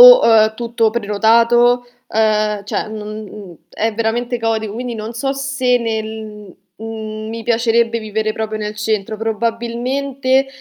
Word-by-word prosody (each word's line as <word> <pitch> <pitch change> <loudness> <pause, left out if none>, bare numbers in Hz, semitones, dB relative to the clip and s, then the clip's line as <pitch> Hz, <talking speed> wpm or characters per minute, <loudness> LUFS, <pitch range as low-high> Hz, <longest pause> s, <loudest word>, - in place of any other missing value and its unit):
o, - - +11
uhm, 220 -1 +5
tutto 230 -1 0
prenotato, 235 +3 +3 0.2
ehm, 215 -1 +1
cioè 205 - -2
non 215 -1 -6
n 195 -5 -11
è 225 0 -1
veramente 235 +2 -1
caotico, 220 -2 -1
quindi 245 +1 -4
non 220 +1 -5
so 270 +4 -2
se 270 -2 +1
nel 220 -3 -5 0.2
mhmm, 220 -1 -6
mi 230 0 -5
piacerebbe 230 0 +2
vivere 215 0 -2
proprio 220 0 -3
nel 210 0 -4
centro. 215 0 -1
Probabilmente 240 +5 0
225 Hz, 135 wpm, -18 LUFS, 215-240 Hz, 0.2 s, o